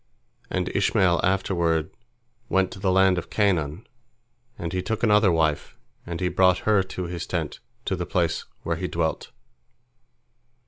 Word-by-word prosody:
And - - -1
Ishmael 90 -3 +2
afterward 85 -4 +1 0.6
went 95 -1 +2
to - - -9
the 95 0 +1
land 95 -1 +4
of - - -10
Canaan, 90 -4 0 0.7
and 85 0 -5
he 95 - 0
took 110 +4 -3
another 105 -3 +5
wife, 80 -3 0 0.3
and 85 -1 -4
he 90 - 0
brought 90 0 +4
her 105 -2 +4
to 95 0 -5
his 85 -1 -5
tent, 80 -4 -3 0.3
to 95 - 0
the 90 -2 -4
place 85 -3 0 0.2
where 85 -1 -1
he 90 +1 -3
dwelt. 80 -2 -2
90 Hz, 150 wpm, -25 LUFS, 85-95 Hz, 0.7 s, another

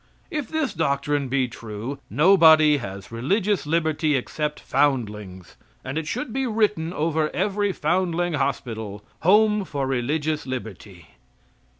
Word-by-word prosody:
If 300 -5 -3
this 315 -4 -1
doctrine 145 -3 0
be 130 0 +1
true 115 +3 -7
nobody 160 -3 +6
has 100 -6 -8
religious 185 - 0
liberty 155 -1 +1
except 150 +3 -2
foundlings, 105 -10 -1 0.3
and 130 +1 -4
it 160 -1 -3
should 245 - -4
be 270 -1 -1
written 210 -7 0
over 155 -2 0
every 205 +1 0
Foundling 175 -2 0
Hospital: 110 -7 -3
"Home 210 +3 +4
for 140 -6 -3
Religious 145 +4 -1
Liberty." 100 -8 -7
150 Hz, 120 wpm, -24 LUFS, 125-180 Hz, 0.3 s, nobody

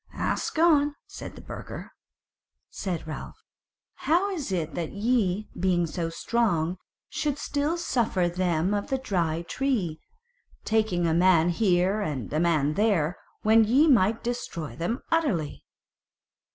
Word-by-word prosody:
"Ask - - -1
on," 295 -3 +4
said - - -9
the - - -11
burgher. - - -8 0.8
Said 180 -5 -4
Ralph: 155 - -7 0.7
"How 360 +5 +3
is 310 - -4
it 165 -4 -2
that 170 -2 -3
ye, 210 -2 +1
being 175 -1 +2
so 165 0 -3
strong, 180 -3 0 0.3
should 300 -2 -2
still 290 +4 -1
suffer 225 - +1
them 175 +1 0
of 205 -1 -1
the 265 - +1
Dry 170 -10 -1
Tree, 190 - -1 0.6
taking 215 -6 +1
a 165 - +2
man 175 -1 +4
here 185 +2 +2
and 145 - -4
a 155 - +1
man 155 -4 +2
there, 180 -5 +1 0.3
when 220 +1 +6
ye 255 +8 +4
might 225 -5 +3
destroy 170 - -4
them 200 - -3
utterly?" 250 - 0
190 Hz, 135 wpm, -26 LUFS, 170-240 Hz, 0.8 s, when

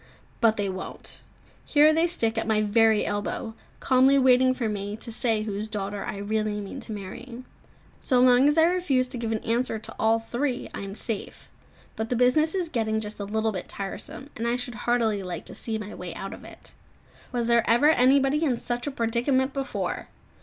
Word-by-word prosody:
But 225 -2 +3
they 205 -1 0
won't; 190 0 -7 0.4
here 305 +1 +5
they 325 +2 +3
stick 230 -10 0
at 225 - -2
my 215 -1 +2
very 220 0 +3
elbow, 205 +3 -3 0.3
calmly 265 +1 +4
waiting 255 -1 +4
for 240 -3 -2
me 205 0 -4
to 230 - -6
say 220 -2 0
whose 210 0 -4
daughter 205 -1 -4
I - - -5
really 210 +1 -1
mean 200 -1 -7
to - - -9
marry. 225 +5 -8 0.6
So 255 -3 +2
long 250 +2 +6
as 295 +2 +2
I 320 - +6
refuse 325 -7 +2
to 250 -2 -3
give 230 -1 -2
an 220 - -2
answer 235 0 0
to 220 +1 -9
all 225 +1 +3
three, 245 +3 -2
I - - -5
am 195 0 -6
safe; 225 -2 -5 0.5
but 220 0 -3
the 250 - 0
business 280 +8 +3
is 365 -3 0
getting 220 -6 -1
just 210 -1 -7
a 200 - -3
little 220 +2 0
bit 185 -3 -6
tiresome, 225 +7 -6
and 230 +1 -2
I 235 - +1
should 245 0 -5
heartily 225 -2 0
like 180 -3 -6
to - - -7
see 225 -1 -3
my 210 -1 -7
way 180 -2 -7
out 195 - -6
of - - -11
it. - - -13 0.6
Was 240 -2 -1
there 235 -1 +3
ever 240 +7 +5
anybody 275 +2 +3
in 260 -6 +1
such 240 +3 -4
a - - -1
predicament 260 +3 0
before! 275 -1 -3
230 Hz, 205 wpm, -26 LUFS, 215-255 Hz, 0.6 s, long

